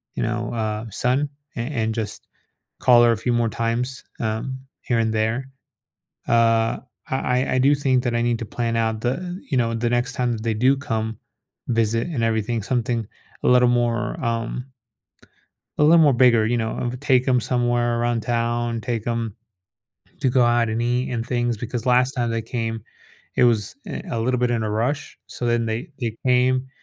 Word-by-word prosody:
you - - -1
know, 115 0 -2
uh, 110 -1 -2
son 130 +7 0 0.3
a - - -1
and 115 -4 -2
just 110 -3 -5 0.5
call 120 -1 +6
her 120 - +5
a - - -2
few 120 +3 -1
more 120 -1 +1
times, 115 +3 -2 0.2
um, 110 +4 -3 0.2
here 120 -2 0
and 110 -1 +1
there. 115 +4 -1 0.8
Uh, 115 -1 +3 0.3
I 130 -1 +1
I - - -2
I - - +3
do 140 +3 +5
think 130 -3 +1
that 120 -2 -1
I 120 - +1
need 120 -1 0
to 115 - -4
plan 115 +1 -2
out 110 -1 0
the, 120 +1 +1 0.4
you 135 - +2
know, 115 -2 +1
the 120 +1 0
next 120 +2 0
time 125 -1 0
that 110 - -5
they 115 -1 0
do 130 +5 +4
come 110 -5 -3 0.5
visit 115 +1 +1
and 145 -9 -2
everything, 115 0 0
something 115 -1 -1 0.4
a - - +1
little 125 0 +5
more, 120 0 0
um 115 +2 -2 1.1
a - - +3
little 165 +3 +7
more 145 -3 +5
bigger. 120 -3 +5
You 120 +2 +1
know, 110 -1 -2
I - - -2
would 125 +1 -4
take 130 -3 +3
'em 125 -1 +4
somewhere 120 -1 +1
around 120 -1 0
town, 120 0 -1
take 115 -1 -3
'em 115 -3 -2 0.9
to 135 - +2
go 125 0 +4
out 120 -1 +3
and 110 +1 -1
eat 125 +2 0
and 115 -2 -3
things 120 -1 0
because 120 +2 -4
last 125 +1 +3
time 120 -3 -1
they 115 0 -1
came, 115 -2 -3 0.5
it - - +5
was 110 -4 +1
I - - -5
a 115 - -1
little 125 +2 0
bit 125 -1 +2
in 115 -2 0
a 110 - -2
rush. 120 +7 -2
So 120 - -5
then 120 -1 +1
they 115 +9 -3
they 115 -3 -3
came, 130 +1 +3
120 Hz, 195 wpm, -23 LUFS, 115-125 Hz, 1.1 s, little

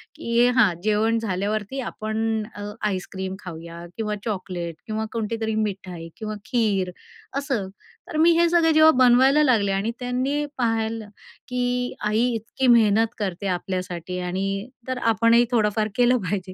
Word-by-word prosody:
की 235 +1 +2
हां, 245 -7 +4
जेवण 220 +2 +2
झाल्यावरती 210 +4 -2
आपण 220 0 -2
अ, 205 - -7 0.3
आईस्क्रीम 190 0 -4
खाऊया 170 -1 -9
किंवा 210 -1 -2
चॉकलेट 185 -5 -4
किंवा 220 0 -2
कोणतीतरी 220 0 -2
मिठाई 185 -6 -3
किंवा 215 -1 -5
खीर 205 -7 0 0.5
असं. 260 -9 -2 0.4
तर 310 - -3
मी 330 +2 +6
हे 340 0 +4
सगळं 335 -2 +4
जेव्हा 315 0 +7
बनवायला 265 +5 +5
लागले 220 -8 +3
आणि 195 +4 0
त्यांनी 260 +4 -1
पाहिलं 225 -2 -1 0.4
की 250 0 -1
आई 215 +3 +2
इतकी 230 +4 -2
मेहनत 225 -2 +5
करते 195 -1 -3
आपल्यासाठी, 180 -1 -3
आणि 195 +5 -2 0.2
तर 255 -1 -2 0.2
आपणही 230 +2 +4
थोडंफार 215 -2 +2
केलं 245 +1 +4
पाहिजे 190 -2 -3
220 Hz, 140 wpm, -24 LUFS, 195-245 Hz, 0.5 s, जेव्हा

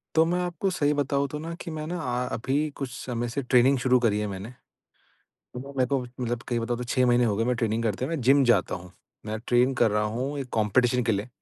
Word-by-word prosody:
तो 160 - +6
मैं 175 +2 0
आपको 180 +2 -1
सही 145 -4 +1
बताऊँ 140 -1 0
तो 150 +2 -6
ना 165 +2 -5
कि 170 - -6
मैं 155 - -4
आ 125 -7 -2
अभी 130 +4 -2 0.2
कुछ 135 -2 -4
समय 120 -2 -4
से 140 +4 -2
ट्रेनिंग 125 +2 +4
शुरू 125 0 +4
करी 110 -4 +1
है 105 - -1
मैंने। 100 +2 -6 0.8
तो 125 - -11
न, 140 +2 -9
मेरे 130 -1 +2
को 140 - +1
मतलब 120 -1 -4
कहीं 120 - 0
बताओ 120 +1 -1
तो 125 - -5
6 125 +1 +1
महीने 120 0 +4
हो 105 -3 +1
गए 115 - +1
मैं 125 +1 +1
ट्रेनिंग 115 -1 0
करते 110 +2 -1
हैं 145 - -3
मैं 160 -4 -2
जिम 135 +3 +5
जाता 120 -7 +3
हूँ। 90 0 -9 0.4
मैं 110 +1 -3
ट्रेन 125 +2 +3
कर 110 - +5
रहा 105 +1 +1
हूँ 135 +4 -3
1 135 -2 -5
कॉम्पिटिशन 120 +3 +2
के 115 - +1
लिए। 100 +4 -2
125 Hz, 250 wpm, -26 LUFS, 115-140 Hz, 0.8 s, तो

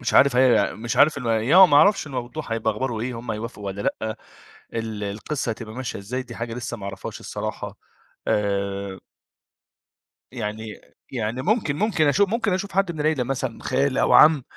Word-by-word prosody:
مش - - -2
عارف 135 -2 +6
هي 125 -5 +4
مش 115 +2 -4
عارف 150 -1 +5
إن 125 - -6
يعني 115 +6 +2
ما 145 - +4
أعرفش 195 +1 +5
الموضوع 130 0 -5
هيبقى 110 -1 0
أخباره 115 0 -3
إيه، 120 0 -3
هم 115 -1 -6
هيوافقوا 110 -1 -5
والّا 100 +1 -4 0.2
لأ، 110 0 -3 0.6
ال 110 -2 -3
القِصّة 110 +7 -3
هتبقى 110 -1 -7
ماشية 130 -4 -5
إزاي، 125 +6 -4
دي 120 -2 -11
حاجة 115 0 -4
لسّه 120 -1 -5
ما 100 - -9
أعرفهاش 100 -1 -6
الصراحة. - - -5 0.5
آآ 100 -1 -1 1.3
يعني 110 -3 -5 0.3
يعني 120 +1 -2
ممكن 190 -7 +1
ممكن 185 -5 +1
أشو 200 +8 +4
ممكن 220 0 0
أشوف 195 +2 -2
حد 190 -2 +1
من 155 - -7
العيلة 150 -4 +1
مثلًا 130 -2 -3
خال 135 +1 0
أو - - +3
عم، 150 -3 +7
120 Hz, 175 wpm, -23 LUFS, 110-145 Hz, 1.3 s, عم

